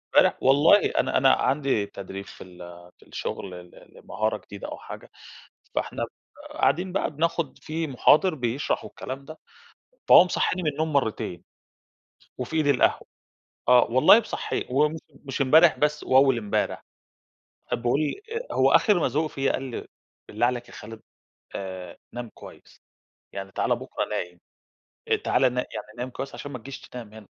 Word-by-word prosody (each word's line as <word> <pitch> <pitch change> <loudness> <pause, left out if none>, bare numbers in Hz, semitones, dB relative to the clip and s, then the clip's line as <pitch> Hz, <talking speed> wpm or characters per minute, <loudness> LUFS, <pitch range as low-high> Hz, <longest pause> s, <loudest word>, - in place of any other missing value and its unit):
امبارح - - +5
والله، 145 +9 +5
أنا 130 - +1
أنا 135 0 +5
عندي 135 -7 +1
تدريب 100 0 -8
في - - -12
ال 90 -1 -16 0.4
في - - -22
الشغل 100 - -5
ل 90 0 -14
لمهارة 110 +2 -1
جديدة 100 -1 -10
أو - - -7
حاجة، - - -11 0.6
فإحنا - - -2
ب - - -5 0.5
قاعدين 180 +2 +1
بقى 195 - -1
بناخد 160 0 -2
في 160 +1 -4
مُحاضر 155 +6 +4
بيشرح 125 0 -2
والكلام 135 +2 -7
ده، 155 +3 -11 0.7
فهو - - +9
مصحيني 180 0 -1
من 155 - +1
النوم 155 +2 -2
مرتين، 110 -9 -1 0.9
وفي 125 +5 -5
إيدي 155 -3 +3
القهوة، 130 - +1 0.6
آه 125 0 +6
والله، 130 - +7
مصحيني 225 - -4
و 145 +4 +3 0.4
مش 135 +1 -3
امبارح 155 +5 +6
بس، 150 0 0
وأول 130 -2 +4
مبارح، 105 -1 -2 0.9
باقول 120 +4 +1 0.5
هو - - +3
آخر 210 -4 +5
ما - - +2
زهق 155 +2 0
فيا 135 -3 -1
قال - - -3
لي: - - -6 0.4
"بالله 110 +3 +1
عليك 120 -1 -3
يا - - -14
خالد، 110 +1 -10 0.5
آآ 95 -2 -7 0.2
نام 120 -1 -6
كويس - - -15 0.5
يعني، 95 -1 -7
تعالَ - - 0
بكرا - - -4
نايم، 90 -1 -5 0.8
تعالَ 125 - +2
نا 125 - -1
يعني - - -6
نايم 125 +1 -4
كويس 135 +2 -7
عشان 145 - -7
ما 125 - -5
تجيش 135 +3 -9
تنام 115 -4 -10
هنا، 110 -2 -12
130 Hz, 155 wpm, -25 LUFS, 110-150 Hz, 0.9 s, فهو